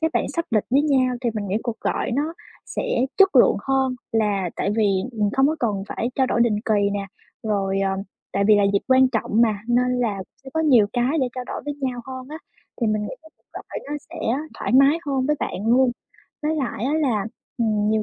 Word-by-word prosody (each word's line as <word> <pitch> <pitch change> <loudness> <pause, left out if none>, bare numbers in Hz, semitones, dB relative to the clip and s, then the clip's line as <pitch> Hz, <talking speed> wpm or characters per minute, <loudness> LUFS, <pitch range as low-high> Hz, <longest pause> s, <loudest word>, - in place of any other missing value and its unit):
các 320 0 +1
bạn - - +2
sắp 335 0 0
lịch 215 -3 +2
với 280 +3 +4
nhau 260 -4 +2
thì 240 -2 0
mình 205 -2 -3
nghĩ 200 - 0
cuộc 235 -3 -4
gọi - - -1
nó 300 +6 -1 0.3
sẽ - - -3 0.4
chất 390 0 +6
lượng - - +6
hơn, 265 -1 +1 0.2
là 205 -5 +1
tại 200 - 0
vì 220 - +3 0.3
mình 210 -2 0
không 270 +1 +4
có 315 +2 0
cần 205 -5 0
phải 235 - -2
trao 265 -1 +2
đổi 235 - 0
định 230 -3 +3
kỳ 205 -2 +2
nè. 200 -1 -3 0.4
Rồi, 195 -2 0
ờm, 195 0 0 0.3
tại 200 0 +1
vì 215 -1 +6
là 205 - +3
dịp 200 - +4
quan 260 0 +6
trọng 220 -1 0
mà, 215 -3 +2
nên 250 +1 +2
là 205 -5 -1 0.2
sẽ 265 - -9
có 320 - +1
nhiều 250 -10 +5
cái 255 +6 +1
để 255 - +1
trao 250 -1 -4
đổi - - -6
với 290 -1 -3
nhau 255 -2 -2
hơn 260 -1 -7
á, 310 +1 -7 0.4
thì 230 - +2
mình 215 -1 0
nghĩ - - -5 0.4
gọi - - -7
nó - - -2 0.2
sẽ - - -9 0.4
thoải - - -2
mái 275 +5 +6
hơn 270 -2 0
với 300 0 +1
bạn 205 +4 -3
luôn. 250 +2 +4 0.5
Với 310 +1 0
lại 250 -5 -2
á 280 - 0
là, 240 -10 +1 0.3
ừm, 215 -2 +1
nhiều 220 -1 +2
240 Hz, 230 wpm, -23 LUFS, 210-270 Hz, 0.5 s, chất